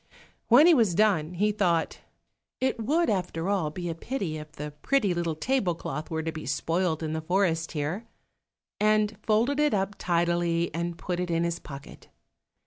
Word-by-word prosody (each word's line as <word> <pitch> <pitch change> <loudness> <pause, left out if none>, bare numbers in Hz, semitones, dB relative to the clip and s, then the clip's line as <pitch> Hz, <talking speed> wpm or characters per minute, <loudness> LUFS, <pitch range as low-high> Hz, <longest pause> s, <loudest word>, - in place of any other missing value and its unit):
When 250 +6 +7
he 350 - +7
was 220 - +3
done, 180 -5 +2
he 210 +4 +2
thought, 175 -6 0 0.6
"It 260 -3 0
would 320 +8 +2
after 180 -4 -1
all 190 -7 +1
be 175 +3 -5
a 165 - -2
pity 170 -3 -4
if 150 0 -10
the 150 -1 -6
pretty 260 -9 +2
little 170 -2 -1
table 195 -1 0
cloth 150 -1 -5
were 160 -1 -2
to 160 - -2
be 160 -4 -7
spoilt 165 +4 0
in 155 0 -2
the 160 - -2
forest 165 -1 0
here," 160 +9 -3 0.7
and 215 0 +2
folded 235 +7 +1
it 300 -6 +3
up 195 +1 -1
tidily 170 -1 +1
and 170 +1 -3
put 180 -1 -3
it 180 -1 -2
in 165 0 +1
his 170 0 -1
pocket. 140 -1 -11
175 Hz, 180 wpm, -27 LUFS, 160-210 Hz, 0.7 s, When